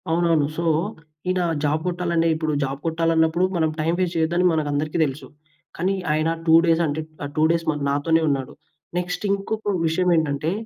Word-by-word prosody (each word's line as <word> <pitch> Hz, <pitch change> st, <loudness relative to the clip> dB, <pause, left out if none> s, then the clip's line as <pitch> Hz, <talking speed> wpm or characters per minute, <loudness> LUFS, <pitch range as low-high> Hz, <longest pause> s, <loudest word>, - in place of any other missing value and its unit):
అవునవును. 165 Hz, -2 st, +2 dB
సో, 170 Hz, -, -1 dB, 0.7 s
ఈయన 185 Hz, 0 st, +1 dB, 0.2 s
జాబ్ 150 Hz, +1 st, +1 dB
కొట్టాలంటే, 170 Hz, -2 st, 0 dB
ఇప్పుడు 155 Hz, -1 st, -2 dB
జాబ్ 135 Hz, 0 st, -3 dB
కొట్టాలన్నప్పుడు. 165 Hz, +1 st, +2 dB
మనం 160 Hz, -2 st, +2 dB
టైమ్ 165 Hz, +3 st, 0 dB
వేస్ట్ 180 Hz, -2 st, -1 dB
చేయొద్దని 170 Hz, +3 st, +1 dB
మనకందరికి 150 Hz, 0 st, -1 dB
తెలుసు. 140 Hz, +1 st, -6 dB, 0.5 s
కానీ 185 Hz, +3 st, 0 dB, 0.2 s
ఆయన 155 Hz, +1 st, +1 dB, 0.2 s
2 160 Hz, -1 st, +6 dB
డేస్ 165 Hz, 0 st, +3 dB
అంటే 150 Hz, +2 st, -2 dB, 0.2 s
ఆ -, -, -2 dB
2 155 Hz, -, +2 dB
డేస్ 165 Hz, -1 st, 0 dB
మరి 150 Hz, -1 st, -5 dB
నాతోనే 160 Hz, +4 st, +2 dB
ఉన్నాడు. 135 Hz, -2 st, -2 dB, 0.5 s
నెక్స్ట్ 180 Hz, +2 st, -4 dB
ఇంకొక 205 Hz, +1 st, -2 dB
విషయం 180 Hz, +3 st, +1 dB
ఏంటంటే 155 Hz, 0 st, 0 dB
160 Hz, 165 wpm, -23 LUFS, 155-175 Hz, 0.7 s, 2